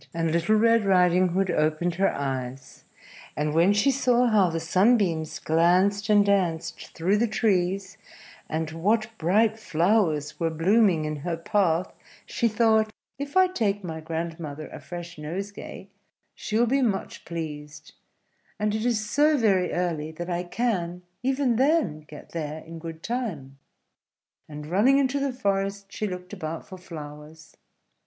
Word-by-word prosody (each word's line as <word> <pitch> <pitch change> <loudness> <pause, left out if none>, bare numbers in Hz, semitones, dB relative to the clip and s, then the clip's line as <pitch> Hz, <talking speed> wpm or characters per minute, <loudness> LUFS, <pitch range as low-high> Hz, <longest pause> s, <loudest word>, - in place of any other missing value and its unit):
And 165 -1 0
Little 170 +6 +2
Red 230 +1 +4
Riding 180 -1 +4
Hood 185 +2 0
opened 155 +3 +1
her 195 - +3
eyes; 135 -1 -5 0.5
and 150 0 0
when 170 +5 +4
she 205 +7 +3
saw 250 -2 +2
how 210 -6 +4
the 165 0 -2
sunbeams 170 -3 +2
glanced 185 +6 +2
and 205 -1 +5
danced 170 -5 0
through 185 +5 +1
the 235 +3 +2
trees, 195 -2 0 0.5
and 160 0 -2
what 215 +7 0
bright 215 +6 +2
flowers 165 -5 +1
were 165 -1 +1
blooming 175 0 +3
in 155 0 -3
her 165 +3 -3
path, 175 -1 0 0.3
she 235 - 0
thought, 220 -1 +3 0.3
"If 285 +5 -3
I 375 - +7
take 210 - -1
my 160 -3 -5
grandmother 160 -2 -5
a - - -9
fresh 175 -2 -8
nosegay 195 +7 -7 0.4
she 215 - -3
will 235 - +4
be 270 +4 +1
much 215 -6 -2
pleased; 155 -2 -7 0.7
and 210 0 0
it 220 0 -2
is 215 -3 0
so 295 +5 +3
very 195 -7 +2
early 165 -4 -2
that 175 +2 -5
I 175 +1 -2
can, 180 -4 -2 0.2
even 260 -2 +1
then, 275 - +2
get 150 - -12
there 155 -1 -5
in 165 +1 -9
good 165 0 -8
time:" 170 - -4 0.9
and 150 0 -8
running 210 - +3
into 280 0 +1
the 275 -1 0
forest 200 -4 -2
she 215 - -2
looked 180 0 -7
about 160 -4 -5
for 185 - -10
flowers. 155 -2 -11
180 Hz, 150 wpm, -26 LUFS, 160-215 Hz, 0.9 s, I